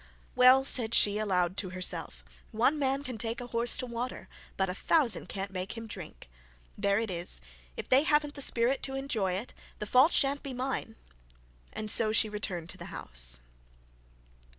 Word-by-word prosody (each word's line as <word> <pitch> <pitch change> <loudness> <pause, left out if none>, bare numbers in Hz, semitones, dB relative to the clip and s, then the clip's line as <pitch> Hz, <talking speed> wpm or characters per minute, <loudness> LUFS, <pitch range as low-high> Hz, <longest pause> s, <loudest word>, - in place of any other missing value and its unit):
'Well,' 255 +1 +7
said 235 -4 0
she 205 0 +5
aloud 185 -3 0
to 185 - -2
herself, 180 - -4 0.3
'one 260 +7 +2
man 275 0 0
can 255 -5 -7
take 230 +1 -3
a 245 - -6
horse 235 0 +1
to 255 - -2
water, 240 +1 -5 0.3
but 190 - +1
a 180 - -3
thousand 265 - +1
can't 195 0 -4
make 190 +4 -5
him 230 - -6
drink. 180 - -9 0.5
There 200 0 +1
it 220 -2 -2
is. 170 - +2 0.4
If - - -5
they 260 +2 +5
haven't 295 -1 +1
the 285 - -7
spirit 250 +1 +2
to 270 - -3
enjoy 230 -9 -1
it, 200 +7 -5 0.2
the 210 - -4
fault 255 +9 +5
shan't 280 +1 +2
be 270 -2 -7
mine;' 250 -3 -3 0.8
and 215 -1 -3
so 220 -2 +3
she 220 0 +4
returned 190 -5 -4
the - - -6
house. - - -5
225 Hz, 175 wpm, -30 LUFS, 190-260 Hz, 0.8 s, Well